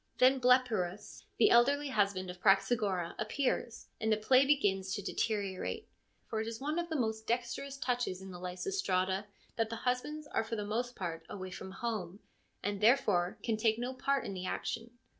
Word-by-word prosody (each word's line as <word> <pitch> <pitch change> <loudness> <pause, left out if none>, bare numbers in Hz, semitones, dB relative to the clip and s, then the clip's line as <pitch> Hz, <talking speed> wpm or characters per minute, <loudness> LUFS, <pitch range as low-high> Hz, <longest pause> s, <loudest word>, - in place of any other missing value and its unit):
Then 260 +1 +5
Blepyrus, 230 -7 +1
the 415 - +5
elderly 280 +4 +4
husband 200 -6 +1
of 180 0 -13
Praxagora, 195 -3 +2
appears, 235 0 -1
and 220 -1 0
the 215 - +4
play 255 +5 +4
begins 195 -9 +2
to 205 - -3
deteriorate, 200 -2 -2 0.4
for 220 -1 -2
it 220 - -4
is 230 0 -5
one 300 +5 -1
of 345 0 -3
the 320 - -2
most 220 -4 -1
dexterous 245 +4 -2
touches 245 -8 -1
in 190 0 -9
the 180 - -8
Lysistrata 185 - -1 0.3
that 225 -1 +1
the 230 - -3
husbands 295 +5 -1
are 295 - -1
for 225 +1 -4
the 210 -2 -3
most 240 +4 -2
part 170 -3 -4
away 185 -2 -6
from 190 +1 -7
home, 200 -3 -4 0.4
and 205 0 -2
therefore 205 -7 +3
can 225 -2 0
take 220 0 +2
no 245 +2 -3
part 275 +1 0
in - - -4
the 185 -1 -4
action. 230 +4 -3
220 Hz, 180 wpm, -33 LUFS, 190-250 Hz, 0.4 s, Then